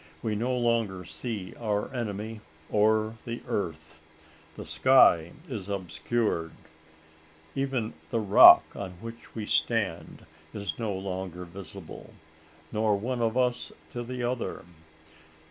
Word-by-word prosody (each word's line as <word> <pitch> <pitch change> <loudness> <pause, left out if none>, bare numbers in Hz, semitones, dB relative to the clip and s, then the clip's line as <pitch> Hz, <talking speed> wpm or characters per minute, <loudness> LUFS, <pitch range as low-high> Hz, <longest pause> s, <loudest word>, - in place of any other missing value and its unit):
We 110 -2 0
no 125 +4 0
longer 115 -6 0
see 105 -1 -5
our 105 -1 -1
enemy 110 -2 -4 0.3
or 110 +1 +2
the 115 0 -6
earth. 80 -4 -4 0.6
The - - -8
sky 85 -1 +5
is 105 - -6
obscured 90 -1 -1 1.0
even 135 -5 -1 0.2
the 115 - 0
rock 100 -2 +9
on 95 -2 -5
which 115 +6 -11
we 110 -2 -3
stand 95 -9 -1 0.3
is 100 +1 -4
no 110 -3 -1
longer 95 -2 -4
visible, 90 0 -10 0.6
nor 110 -1 +2
one 120 +4 -2
of 115 +1 +1
us 125 -1 +1 0.2
to 120 - -4
the 125 +1 -5
other! 120 0 -2
110 Hz, 120 wpm, -28 LUFS, 95-120 Hz, 1.0 s, rock